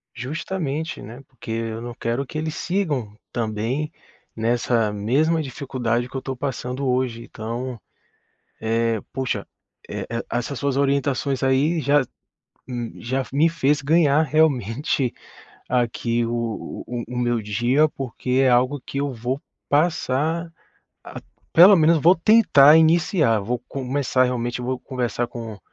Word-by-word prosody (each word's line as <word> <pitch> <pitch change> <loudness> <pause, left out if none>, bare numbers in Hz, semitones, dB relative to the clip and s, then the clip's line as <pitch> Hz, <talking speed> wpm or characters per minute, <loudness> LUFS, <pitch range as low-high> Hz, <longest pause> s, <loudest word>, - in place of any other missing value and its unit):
Justamente, 155 +4 -4
né, 120 +5 -10
porque 120 -3 -10
eu 115 0 -3
não 120 0 -6
quero 120 +3 -2
que 155 - -7
eles 155 +1 -3
sigam 145 - -2 0.2
também 115 +6 -2 0.4
nessa 115 -1 +1
mesma 140 +11 +1
dificuldade 125 -3 -2
que - - -13
eu 130 - -4
tô 135 -1 -4
passando 130 0 -3
hoje. 125 -2 0
Então, 120 +2 -5 0.8
eh, 115 0 0
poxa, 130 -1 -2 0.4
eh, - - -5
e 115 0 -3
essas 120 +3 -2
suas 140 -2 -1
orientações 140 -1 0
aí 140 +5 +2
já 145 +1 +3 0.7
hum, 120 -2 -4
já 130 +3 -1
me 155 +4 +3
fez 145 -3 +1
ganhar 150 0 +4
realmente 140 -3 +1 0.6
aqui 120 -1 0
o 115 -1 -4
o 120 0 -4
o 125 - -6
meu 120 -2 0
dia, 120 +9 +2
porque 130 -2 -5
é 130 - +4
algo 125 +4 +2
que 140 - -7
eu 140 -1 -1
vou 125 +3 -3 0.3
passar 160 +1 +1 0.5
a - - -8 0.3
pelo 190 +4 +9
menos 160 0 +4
vou 170 +5 +6
tentar 165 -7 +6
iniciar, 160 - +3
vou 120 +5 -2
começar 130 -1 0
realmente 125 0 -2
vou 130 +1 -2
conversar 125 -2 -2
com 115 -4 -8
130 Hz, 140 wpm, -23 LUFS, 120-145 Hz, 0.8 s, pelo